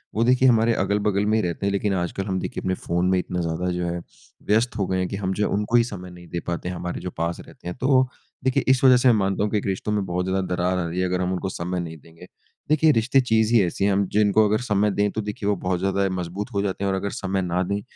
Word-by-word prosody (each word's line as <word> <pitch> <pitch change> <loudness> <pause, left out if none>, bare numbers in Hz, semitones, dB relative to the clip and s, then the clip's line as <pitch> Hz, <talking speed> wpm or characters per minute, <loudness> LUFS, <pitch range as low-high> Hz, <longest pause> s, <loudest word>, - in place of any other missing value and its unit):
वो 115 - +2
देखिए 130 +2 +4
हमारे 115 0 +4
अगल-बगल 100 0 +1
में 110 +1 +2
रहते 90 +2 -3
हैं। 100 - +1
लेकिन 100 0 0
आजकल 90 +2 -2
हम 95 -1 -1
देखिए - - -4
अपने 95 - -1
फ़ोन 85 +1 +1
में 95 - +3
इतना 90 0 -3
ज़्यादा 85 +2 -2
जो 90 0 -2
है 85 0 -2 0.5
व्यस्त 115 +3 +2
हो 100 - 0
गए 95 - 0
हैं 90 - 0
कि 100 - -5
हम 95 -1 -2
जो 105 - +2
उनको 105 +3 0
ही 120 - +6
समय 95 -6 -7
नहीं 90 -1 -13
दे 85 - -4
पाते 85 +1 -3
हैं 90 - -4
हमारे 90 0 -5
जो 90 - -4
पास 85 +1 -2
रहते - - -13
हैं। 90 - -4
तो 130 -1 +4 0.4
देखिए 130 -1 +1
इस 130 0 +3
वजह 130 -1 +7
से 125 - +2
मैं 120 - +6
मानता 95 +1 0
हूँ 105 - -1
कि 105 - +1
एक 105 - -3
रिश्तों 95 +2 -2
में 105 -2 0
बहुत 90 0 -2
ज़्यादा 95 +1 0
दरार 90 +1 0
आ 85 - -2
रही 90 +2 -3
है। 90 - +1
अगर 90 0 -1
हम 90 0 0
उनको 95 +1 -2
समय 90 +1 -3
नहीं 80 -2 -6
देंगे। 85 +4 -16 0.4
देखिए 155 +1 +5
रिश्ते 130 +1 +3
चीज़ 110 -2 +2
ही 115 - +6
ऐसी 95 +3 -1
हैं 100 - +3
हम 100 0 +2
जिनको 105 +1 +4
अगर 105 +1 +1
समय 105 -3 +1
दें 100 +1 +1
तो 110 - -3
देखिए 105 0 -4
वो 100 - +2
बहुत 90 0 -2
ज़्यादा 95 +1 +1
मज़बूत 90 +6 -4
हो 100 - +1
जाते 100 0 -2
हैं 100 - +1
और 95 - 0
अगर 100 +1 -2
समय 95 0 -2
ना 90 0 -1
दें 100 +2 -2
95 Hz, 285 wpm, -23 LUFS, 90-105 Hz, 0.5 s, वजह